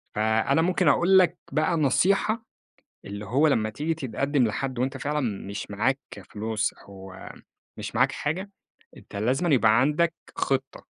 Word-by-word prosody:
فأنا 110 +8 +2
ممكن 180 -1 +1
أقول 175 +7 +5
لك 175 -1 +2
بقى 155 +3 +1
نصيحة، 195 - +2 0.6
اللي 100 +1 -7
هو 140 +9 +3
لما 110 -6 +1
تيجي 150 +9 -2
تتقدم 135 -2 0
لحد 130 +3 -3
وأنتَ 130 +1 -1
فعلًا 150 +1 -2 0.3
مش 100 0 -6
معاك 130 +7 0 0.3
فلوس 110 0 -2
أو 95 -1 -13 0.6
مش - - -6
معاك - - +3
حاجة، 185 +7 -3 0.5
أنتَ - - -14
لازمًا 130 - 0
يبقى 110 0 +4
عندك 160 +4 +2 0.2
خطة. 135 -1 -2
135 Hz, 140 wpm, -26 LUFS, 110-160 Hz, 0.6 s, أقول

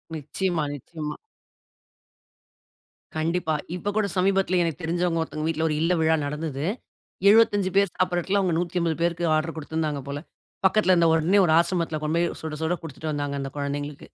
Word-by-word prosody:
நிச்சியமா, 160 +2 -2
நிச்சியமா. 150 +2 -6 2.0
கண்டிப்பா, 160 0 0 0.2
இப்ப 200 +3 -2
கூட 215 -2 +2
சமீபத்தில 190 -1 +2
எனக்கு 165 +1 -3
தெரிஞ்சவங்க 170 0 0
ஒருத்தவங்க 155 -1 -3
வீட்ல 160 0 0
ஒரு 150 - 0
இல்ல 170 +2 +2
விழா 160 0 +4
நடந்தது. 150 0 -3 0.6
75 205 -3 +4
பேர் 200 -3 +4
சாப்பிடுற 180 -1 +1
இடத்தில 200 +3 +1
அவங்க 180 -3 +1
150 170 -2 0
பேருக்கு 170 0 0
ஆர்டர் 160 +1 -1
குடுத்திருந்தாங்க 155 -2 -2
போல. 140 +1 -4 0.5
பக்கத்தில 190 -1 +3
இருந்த 170 -1 +4
உடனே 165 +5 +3
ஒரு 160 - +3
ஆசிரமத்தில 170 -3 0
கொண்டு 155 +2 0
போய் 170 0 0
சுட 160 -1 -4
சுட 160 +2 +1
குடுத்துட்டு 155 0 -5
வந்தாங்க 145 -1 -2
அந்த 135 -1 -5
குழந்தைகளுக்கு. 145 0 -4
165 Hz, 155 wpm, -25 LUFS, 155-180 Hz, 2.0 s, விழா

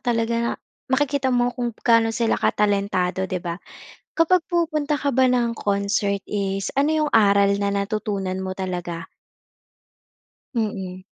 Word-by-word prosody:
talaga 235 -1 0
na 235 - 0 0.4
makikita 275 0 +1
mo 245 -1 +2
kung 240 -2 -4
gaano 230 -1 +5
sila 235 -2 +1
katalentado 200 -2 +1
'di 185 - -2
ba? 170 +1 -4 0.6
Kapag 330 +1 +3
pumupunta 310 -4 0
ka 285 -1 -1
ba 260 0 +4
ng 245 -2 +2
concert 200 -2 -1
is 195 -1 -2
ano 310 +2 +2
'yong 300 - -1
aral 200 -2 +5
na 200 0 0
natutunan 200 -2 -2
mo 190 0 -4
talaga? 175 -2 -4 1.5
Mm. 190 -5 -3
210 Hz, 135 wpm, -23 LUFS, 195-250 Hz, 1.5 s, gaano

